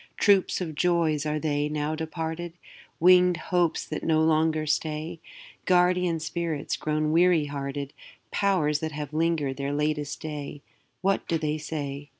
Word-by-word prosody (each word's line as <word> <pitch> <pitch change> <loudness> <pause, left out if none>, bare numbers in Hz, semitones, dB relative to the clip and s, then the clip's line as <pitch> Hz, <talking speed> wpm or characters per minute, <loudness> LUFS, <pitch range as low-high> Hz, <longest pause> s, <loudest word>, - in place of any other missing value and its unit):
Troops 195 -2 +3
of 165 -3 -3
joys 160 -2 +1
are 150 0 0
they, 150 -1 -1
now 150 0 -2
departed? 160 +1 -4 0.5
Winged 180 0 +6
hopes 175 -1 0
that 155 - -5
no 160 -1 +2
longer 155 0 +2
stay? 155 +2 -2 0.5
Guardian 180 -2 +3
spirits 160 -1 -3
grown 155 0 -1
weary 170 -1 +4
hearted? 140 0 -5 0.4
Powers 175 -7 +1
that 160 -1 -4
have 150 -1 -6
linger'd 155 -4 0
their 140 0 -2
latest 150 0 -1
day? 145 -2 -6 0.4
What 195 +1 0
do 165 - +1
they 155 0 -2
say? 145 -2 -5
155 Hz, 145 wpm, -26 LUFS, 150-170 Hz, 0.5 s, Winged